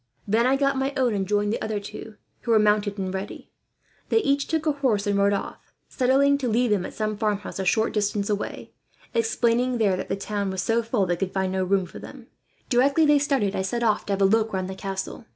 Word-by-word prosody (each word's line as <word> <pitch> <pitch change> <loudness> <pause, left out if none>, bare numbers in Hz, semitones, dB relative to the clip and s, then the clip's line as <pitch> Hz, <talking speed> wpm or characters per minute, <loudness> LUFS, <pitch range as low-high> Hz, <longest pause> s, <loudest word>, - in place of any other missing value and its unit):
Then 225 +4 +3
I 265 - +3
got 275 -1 +1
my 270 +1 -1
own 250 -3 +2
and 195 -2 -2
joined 205 +1 +1
the - - -3
other 220 -1 -2
two, 210 +2 -9 0.3
who - - -8
were 225 - +5
mounted 210 -1 +2
and 190 -1 -3
ready. 190 +1 -6 0.6
They - - +3
each 280 -10 +1
took 320 -1 -1
a 310 - +3
horse 255 -8 0
and 205 -1 +1
rode 200 0 +3
off, 200 - -5 0.2
settling 275 +2 +3
to 260 - -2
leave 235 +1 +1
them 190 -3 +1
at - - -12
some 215 -1 -2
farmhouse 205 -2 -2
a 190 - -2
short 220 +4 +1
distance 205 -1 0
away, 205 -1 -4 0.4
explaining 250 - +1
there 205 -5 +2
that 185 - -5
the - - 0
town 200 0 -3
was 190 -1 -2
so 230 +1 +1
full 230 -3 0
they 175 -1 -1
could 190 +1 -2
find 190 -1 -1
no 190 0 0
room 190 0 +1
for 175 - -11
them. - - -11 0.4
"Directly 275 +5 +3
they 295 - +5
had - - -5
started, 270 -9 0
I - - 0
set 235 +6 -2
off 215 -2 +1
to 200 - 0
have 195 - -2
a - - +6
look 220 +2 +2
round 185 -1 -2
the 190 - -5
castle. 195 +4 -5
215 Hz, 245 wpm, -24 LUFS, 195-250 Hz, 0.6 s, a